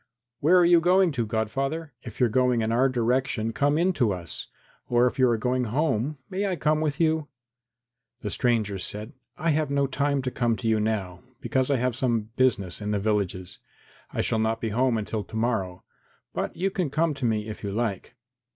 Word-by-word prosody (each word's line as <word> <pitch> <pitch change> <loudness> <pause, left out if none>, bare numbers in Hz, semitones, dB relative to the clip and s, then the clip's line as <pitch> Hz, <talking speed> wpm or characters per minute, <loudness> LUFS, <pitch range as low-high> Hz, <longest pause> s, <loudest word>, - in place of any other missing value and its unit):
"Where 170 +6 +5
are 175 - +6
you 170 0 +6
going 180 +1 +4
to, 120 -6 -2
godfather? 135 +8 -2
If 115 - -10
you 125 - +5
are - - +1
going 125 0 +2
in 110 - 0
our 130 +4 +3
direction 120 -2 0
come 145 +3 +2
in 180 +3 +2
to 120 -9 +2
us, 85 -3 -7 0.4
or 120 0 +4
if 125 - -1
you 130 -1 +5
are 115 - +2
going 125 +2 0
home, 140 +2 0
may 195 +2 -2
I 190 - 0
come 155 -2 +1
with 150 -3 -1
you?" 160 -1 +3
And 155 -2 -8 0.9
the 105 - -4
stranger 110 -5 0
said, 105 +7 -5 0.2
"I 165 0 +1
have 155 -1 +1
no 140 0 +2
time 140 0 0
to 130 - -2
come 120 -3 +1
to 110 +2 -4
you 110 -1 +3
now, 100 -5 -2 0.2
because 130 0 0
I 140 - +3
have 125 -1 0
some 115 -4 -1
business 105 -8 +1
in 105 - -3
the 105 -1 0
villages. 95 -3 -1 0.5
I - - -1
shall 110 - 0
not 110 +1 0
be 115 - -2
home 120 +2 +2
until 105 0 -3
to 110 - -12
morrow, 110 -6 -1 0.5
then - - -1
you 195 +2 0
can 180 -5 -1
come 155 +2 +1
to 135 -3 -4
me 110 -2 0
if 110 - -7
you 100 - -3
like." 105 -2 -3
125 Hz, 215 wpm, -26 LUFS, 110-145 Hz, 0.9 s, are